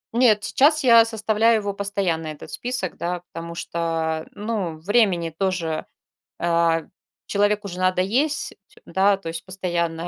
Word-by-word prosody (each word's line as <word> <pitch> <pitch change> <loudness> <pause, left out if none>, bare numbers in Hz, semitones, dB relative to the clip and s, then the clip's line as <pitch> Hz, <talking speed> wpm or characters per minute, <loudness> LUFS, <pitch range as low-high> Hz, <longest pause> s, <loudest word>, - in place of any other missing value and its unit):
Нет, 220 -4 +4
сейчас 305 +6 +3
я 230 -3 +7
составляю 225 0 +2
его 200 -1 -3
постоянно 195 -5 -2
этот 155 -1 -8
список, 245 -7 -3
да. 175 0 -3
Потому 170 0 -6
что, 165 -2 -2
ну, 205 -6 -3
времени 180 -2 +2
тоже, 170 -4 -2 0.5
э, 170 -1 +2 0.4
человеку 205 0 +1
же 180 - -7
надо 185 0 +2
есть, 280 +11 0 0.3
да, 195 +1 +3
то 180 - -10
есть 165 +2 -6
постоянно 175 -3 -2
190 Hz, 135 wpm, -23 LUFS, 170-210 Hz, 0.5 s, я